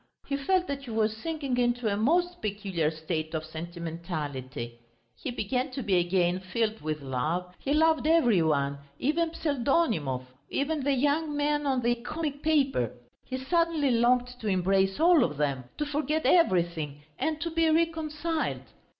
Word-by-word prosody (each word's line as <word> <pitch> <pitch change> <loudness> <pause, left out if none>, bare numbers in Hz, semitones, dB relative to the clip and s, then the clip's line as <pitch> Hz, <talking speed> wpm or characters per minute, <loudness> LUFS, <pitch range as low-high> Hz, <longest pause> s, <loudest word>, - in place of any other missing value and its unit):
He 280 - -2
felt 360 +7 +1
that 280 -4 -4
he - - -9
was 220 -1 +1
sinking 280 0 -3
into 240 -1 +1
a 200 - +1
most 350 - +1
peculiar 195 -6 -1
state 160 0 -4
of 155 0 -3
sentimentality; 160 -7 -5 0.4
he - - -5
began 250 +3 -1
to 265 - -3
be 195 -4 +3
again 175 0 +1
filled 215 +4 -2
with 155 -1 -3
love, 155 +8 -2
he 275 - -3
loved 315 0 +3
every 245 - +4
one, 140 -3 +1 0.2
even 325 +5 +1
Pseldonimov, 250 - 0 0.3
even 290 0 -1
the 285 +1 +2
young 290 +3 +1
man 295 0 +1
on 260 -2 +1
the 240 +1 +3
comic 285 +4 -4
paper. 275 - +2 0.3
He 260 - -4
suddenly 320 0 +1
longed 245 +1 +2
to 220 - -5
embrace 190 0 +2
all 335 -3 +6
of 150 -3 -2
them, 140 -4 -1
to 300 - -1
forget 295 +1 -1
everything 170 - +2 0.2
and 315 -1 -1
to 335 +1 -3
be 325 0 +2
reconciled. 320 0 0
240 Hz, 160 wpm, -28 LUFS, -, 0.4 s, all